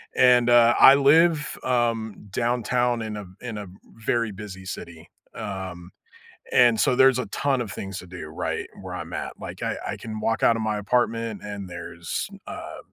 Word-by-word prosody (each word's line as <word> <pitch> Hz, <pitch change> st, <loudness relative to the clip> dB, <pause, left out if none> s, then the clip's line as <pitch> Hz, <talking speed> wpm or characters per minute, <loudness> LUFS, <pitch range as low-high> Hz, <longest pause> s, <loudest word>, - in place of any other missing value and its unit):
and, 125 Hz, -1 st, +5 dB
uh, 120 Hz, 0 st, +6 dB
I 135 Hz, -, +10 dB
live, 150 Hz, +2 st, +4 dB
um, 115 Hz, -4 st, 0 dB, 0.2 s
downtown 120 Hz, +1 st, 0 dB
in 110 Hz, -1 st, -4 dB
a 105 Hz, -, -7 dB, 0.2 s
in 115 Hz, -3 st, -5 dB
a, 105 Hz, -, -6 dB, 0.4 s
very 115 Hz, -3 st, +1 dB
busy 95 Hz, -2 st, -9 dB
city, 85 Hz, -3 st, -8 dB, 0.3 s
um, 95 Hz, -4 st, -6 dB, 0.6 s
and, 120 Hz, -3 st, +5 dB
so, 135 Hz, -, +3 dB
there's 130 Hz, -1 st, +6 dB
a 125 Hz, -, -2 dB
ton 140 Hz, -3 st, 0 dB
of 105 Hz, -6 st, -4 dB
things 95 Hz, 0 st, -6 dB
to 90 Hz, -, -10 dB
do, 90 Hz, -3 st, -8 dB
right, 80 Hz, -, -3 dB
where -, -, -7 dB
I'm -, -, -7 dB
at, -, -, -4 dB
like, -, -, -8 dB
I -, -, -1 dB
I -, -, -3 dB
can 110 Hz, -1 st, -7 dB
walk 115 Hz, +1 st, 0 dB
out 115 Hz, -, +5 dB
of 110 Hz, -, -3 dB
my 110 Hz, -1 st, -1 dB
apartment, 115 Hz, 0 st, 0 dB
and 100 Hz, -2 st, -6 dB
there's, 85 Hz, -1 st, -5 dB, 0.2 s
uh, -, -, -7 dB
115 Hz, 180 wpm, -25 LUFS, 100-125 Hz, 0.6 s, I